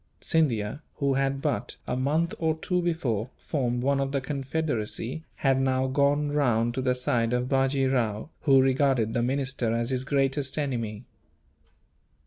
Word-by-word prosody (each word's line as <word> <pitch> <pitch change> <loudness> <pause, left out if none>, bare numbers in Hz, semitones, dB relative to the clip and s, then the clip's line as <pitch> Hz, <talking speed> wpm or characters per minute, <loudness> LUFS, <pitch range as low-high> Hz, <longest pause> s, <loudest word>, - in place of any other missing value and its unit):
Scindia, 135 -5 0
who 140 -2 +1
had 135 0 0
but - - -1
a 125 - -2
month 150 +7 +1
or 160 -1 +1
two 180 +2 0
before 130 - -1
formed 125 -5 -2
one 140 +1 +2
of 135 0 -1
the 140 - +1
confederacy, 135 -1 -3
had 135 -1 +2
now 130 0 +1
gone 145 +2 +2
round 120 -5 +2
to 130 - -2
the 130 -1 +1
side 125 -3 0
of 125 0 0
Bajee 135 0 +2
Rao, 120 0 0
who 135 -3 +5
regarded 130 -4 +2
the 120 - +1
minister 130 -2 -1
as 115 +2 -1
his 130 -1 -1
greatest 135 0 0
enemy. 120 -6 -3
135 Hz, 155 wpm, -27 LUFS, 125-140 Hz, -, who